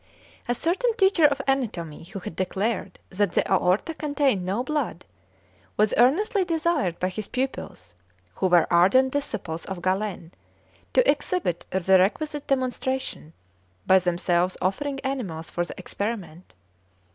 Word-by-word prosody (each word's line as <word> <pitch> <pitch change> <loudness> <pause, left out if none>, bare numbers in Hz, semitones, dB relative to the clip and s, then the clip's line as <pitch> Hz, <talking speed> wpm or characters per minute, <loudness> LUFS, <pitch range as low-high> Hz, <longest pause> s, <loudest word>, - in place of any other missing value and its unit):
A 245 - +1
certain 410 - 0
teacher 385 -6 +4
of 280 -2 +2
anatomy, 190 - -2
who 195 - -8
had 180 -3 -7
declared 195 +3 -2
that 195 -1 0
the - - +1
aorta 190 - +2
contained 285 - 0
no 195 +7 -1
blood, 285 - -3 0.7
was 210 0 +3
earnestly 380 - +3
desired 325 - 0
by 185 - +1
his 210 +2 -4
pupils, 250 - -4 0.4
who 185 - 0
were 175 -2 +5
ardent 255 +10 +5
disciples 205 - -3
of 190 -3 -6
Galen, 185 -2 -2 0.6
to - - +4
exhibit 255 - 0
the 190 0 +3
requisite 295 +10 0
demonstration, 260 - -2 0.5
they 190 - +6
themselves 175 0 0
offering 275 +9 -1
animals 215 - -4
for 175 - -1
the 175 - -8
experiment. 185 - -5
215 Hz, 135 wpm, -25 LUFS, 180-280 Hz, 0.7 s, they